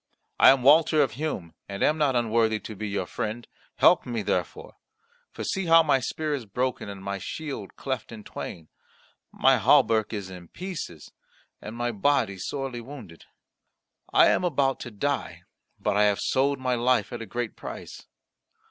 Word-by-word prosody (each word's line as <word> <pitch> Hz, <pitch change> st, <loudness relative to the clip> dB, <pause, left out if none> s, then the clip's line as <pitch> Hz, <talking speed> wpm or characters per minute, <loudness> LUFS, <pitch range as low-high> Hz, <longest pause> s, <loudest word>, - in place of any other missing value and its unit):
I -, -, +9 dB
am 135 Hz, -2 st, +4 dB
Walter 155 Hz, +2 st, +6 dB
of 130 Hz, -, -2 dB
Hum, 120 Hz, -, -4 dB, 0.2 s
and 100 Hz, 0 st, -3 dB
am 155 Hz, +1 st, +2 dB
not 140 Hz, -4 st, +2 dB
unworthy 115 Hz, -2 st, +2 dB
to 110 Hz, -, -8 dB
be 110 Hz, +2 st, -5 dB
your 100 Hz, -, -2 dB
friend. 110 Hz, +2 st, -5 dB, 0.3 s
Help -, -, +5 dB
me 115 Hz, -3 st, -3 dB
therefore. 90 Hz, -4 st, -3 dB, 0.5 s
For -, -, -7 dB
see 190 Hz, -2 st, -2 dB
how 165 Hz, 0 st, +7 dB
my 145 Hz, -4 st, +3 dB
spear 155 Hz, +4 st, -3 dB
is 130 Hz, -6 st, -4 dB
broken 125 Hz, +1 st, -2 dB
and 100 Hz, -1 st, -8 dB
my 100 Hz, 0 st, -3 dB
shield 140 Hz, -, -6 dB
cleft 130 Hz, -5 st, -4 dB
in 110 Hz, -2 st, -9 dB
twain, 80 Hz, -5 st, -8 dB, 0.6 s
my -, -, +4 dB
hauberk 110 Hz, -2 st, +4 dB
is 100 Hz, -4 st, -5 dB
in 90 Hz, -2 st, -10 dB
pieces, 165 Hz, -, -7 dB, 0.5 s
and 110 Hz, -, -8 dB
my 120 Hz, 0 st, -1 dB
body 115 Hz, -3 st, +1 dB
sorely 135 Hz, +2 st, -4 dB
wounded. 120 Hz, -, -11 dB, 0.9 s
I -, -, +6 dB
am -, -, +2 dB
about 140 Hz, -6 st, +1 dB
to 120 Hz, -, -7 dB
die; 140 Hz, +6 st, -3 dB, 0.4 s
but -, -, 0 dB
I 105 Hz, +1 st, +4 dB
have 100 Hz, -1 st, +2 dB
sold 140 Hz, +1 st, +1 dB
my 130 Hz, -1 st, -1 dB
life 125 Hz, +1 st, +1 dB
at 120 Hz, -, -5 dB
a 115 Hz, -, -7 dB
great 120 Hz, -2 st, -4 dB
price." -, -, -9 dB
120 Hz, 175 wpm, -26 LUFS, 105-140 Hz, 0.9 s, I